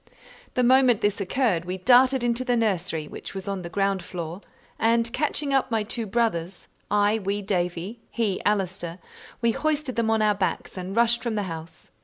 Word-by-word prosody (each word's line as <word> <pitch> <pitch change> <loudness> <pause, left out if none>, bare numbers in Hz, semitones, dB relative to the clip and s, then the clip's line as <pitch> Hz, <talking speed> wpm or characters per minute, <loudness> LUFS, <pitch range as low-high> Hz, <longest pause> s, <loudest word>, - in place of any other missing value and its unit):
The 250 - +2
moment 255 -2 +5
this 205 0 +1
occurred 195 -3 +1
we 180 +1 -3
darted 255 +5 +5
into 240 +1 0
the 250 -1 +1
nursery, 180 -8 -1
which - - -9
was 190 0 -6
on 195 -2 -2
the 170 - -6
ground 195 0 0
floor, 170 +1 -6 0.4
and 230 +1 +2
catching 290 0 0
up 265 -1 +2
my 225 -2 +1
two 225 +1 -4
brothers, 190 -5 -1 0.2
I 205 +2 +3
wee 200 +1 -2
Davie, 180 +2 -2
he 215 -5 -1
Allister, 185 -4 -1 0.5
we 235 - +4
hoisted 300 -1 -1
them 230 -1 +1
on 220 -1 +2
our 210 -1 +4
backs 195 -2 -2
and 185 +1 -5
rushed 235 +1 +4
from 235 -3 -2
the 205 - 0
house. 165 -2 -8
210 Hz, 185 wpm, -25 LUFS, 185-235 Hz, 0.5 s, moment